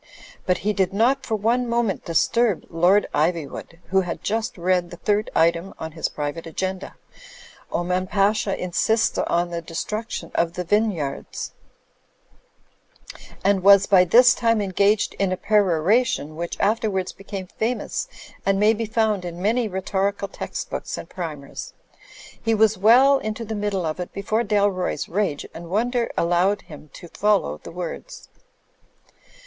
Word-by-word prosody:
But 180 Hz, -, +3 dB
he 210 Hz, -, +2 dB
did 190 Hz, -2 st, 0 dB
not 235 Hz, +7 st, +2 dB
for 220 Hz, -, 0 dB
one 235 Hz, +4 st, 0 dB
moment 235 Hz, -4 st, 0 dB
disturb 200 Hz, +5 st, +1 dB
Lord 180 Hz, +5 st, +4 dB
Ivywood, 165 Hz, +1 st, -2 dB
who 190 Hz, 0 st, +3 dB
had 175 Hz, -2 st, -5 dB
just 225 Hz, +3 st, -2 dB
read 180 Hz, 0 st, +1 dB
the 175 Hz, -, -10 dB
third 210 Hz, +3 st, 0 dB
item 170 Hz, +3 st, +2 dB
on 160 Hz, -, -6 dB
his 160 Hz, +1 st, -2 dB
private 150 Hz, +3 st, -5 dB
agenda 190 Hz, +3 st, -4 dB, 0.8 s
("Oman 180 Hz, +2 st, -1 dB
Pasha 200 Hz, 0 st, +1 dB
insists 220 Hz, +5 st, +1 dB
on 175 Hz, 0 st, 0 dB
the 170 Hz, 0 st, -3 dB
destruction 210 Hz, +7 st, -5 dB
of 170 Hz, 0 st, +1 dB
the 180 Hz, 0 st, -4 dB
vine)rards") 190 Hz, -8 st, -1 dB, 1.9 s
and 195 Hz, -1 st, +3 dB
was 200 Hz, +1 st, +7 dB
by 190 Hz, -2 st, +6 dB
this 245 Hz, +8 st, +6 dB
time 230 Hz, -1 st, +1 dB
engaged 200 Hz, +1 st, +1 dB
in 195 Hz, -2 st, +1 dB
a 185 Hz, -, -1 dB
peroration 195 Hz, -, +2 dB
which 170 Hz, +1 st, -5 dB
afterwards 200 Hz, -3 st, 0 dB
became 195 Hz, -1 st, -7 dB
fa 225 Hz, +6 st, -2 dB
mous -, -, -4 dB, 0.4 s
and 195 Hz, 0 st, +1 dB
may 210 Hz, +2 st, +5 dB
be 225 Hz, +1 st, -3 dB
f 220 Hz, -, -15 dB
oimd 215 Hz, -4 st, +2 dB
in 175 Hz, -1 st, -6 dB
many 225 Hz, +5 st, +1 dB
rhetorical 195 Hz, +1 st, -1 dB
text -, -, -6 dB
books -, -, -4 dB
and -, -, -8 dB
primers. 155 Hz, -6 st, -7 dB, 0.7 s
He 225 Hz, 0 st, +1 dB
was 220 Hz, 0 st, +4 dB
well 250 Hz, +8 st, +6 dB
into 215 Hz, -1 st, -4 dB
the 220 Hz, -, -5 dB
middle 205 Hz, -4 st, -2 dB
of 155 Hz, +2 st, -3 dB
it 180 Hz, -, -5 dB
before 215 Hz, +3 st, -1 dB
Dalroy's 200 Hz, -4 st, 0 dB
rage 185 Hz, -6 st, -1 dB
and 170 Hz, 0 st, -9 dB
wonder 235 Hz, +5 st, 0 dB
allowed 175 Hz, +4 st, +2 dB
him 150 Hz, -1 st, -13 dB
to 175 Hz, -, -11 dB
follow 200 Hz, -, +1 dB
the -, -, -10 dB
words. 180 Hz, -, -7 dB
195 Hz, 155 wpm, -23 LUFS, 175-220 Hz, 1.9 s, was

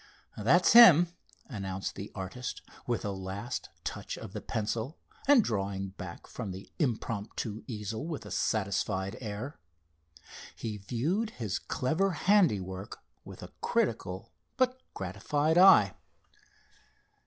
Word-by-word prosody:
"That's 150 Hz, -, +4 dB
him," 175 Hz, -8 st, +9 dB, 0.4 s
announced 95 Hz, -6 st, -4 dB
the 100 Hz, -, -7 dB
artist, 105 Hz, +6 st, -5 dB, 0.2 s
with 120 Hz, -3 st, -1 dB
a 100 Hz, -, -1 dB
last 95 Hz, +6 st, -5 dB
touch -, -, -5 dB
of -, -, -9 dB
the -, -, -5 dB
pencil, 115 Hz, +6 st, -3 dB, 0.3 s
and 280 Hz, -5 st, +7 dB
drawing 100 Hz, -, -2 dB
back 95 Hz, -2 st, -9 dB
from 110 Hz, -5 st, -6 dB
the 95 Hz, +1 st, -8 dB
impromptu 115 Hz, -, -2 dB
easel 110 Hz, +3 st, -4 dB
with 160 Hz, -4 st, -5 dB
a -, -, -9 dB
satisfied 95 Hz, -2 st, 0 dB
air. 110 Hz, +6 st, -5 dB, 1.0 s
He 110 Hz, -2 st, -4 dB
viewed 150 Hz, -, -1 dB
his 105 Hz, -, -3 dB
clever 175 Hz, +9 st, 0 dB
handiwork 105 Hz, -, +1 dB, 0.3 s
with -, -, -10 dB
a -, -, -10 dB
critical 95 Hz, +5 st, -1 dB, 0.3 s
but 255 Hz, 0 st, +1 dB
gratified 145 Hz, -, +1 dB
eye. 195 Hz, +1 st, +8 dB
110 Hz, 120 wpm, -30 LUFS, 95-155 Hz, 1.0 s, him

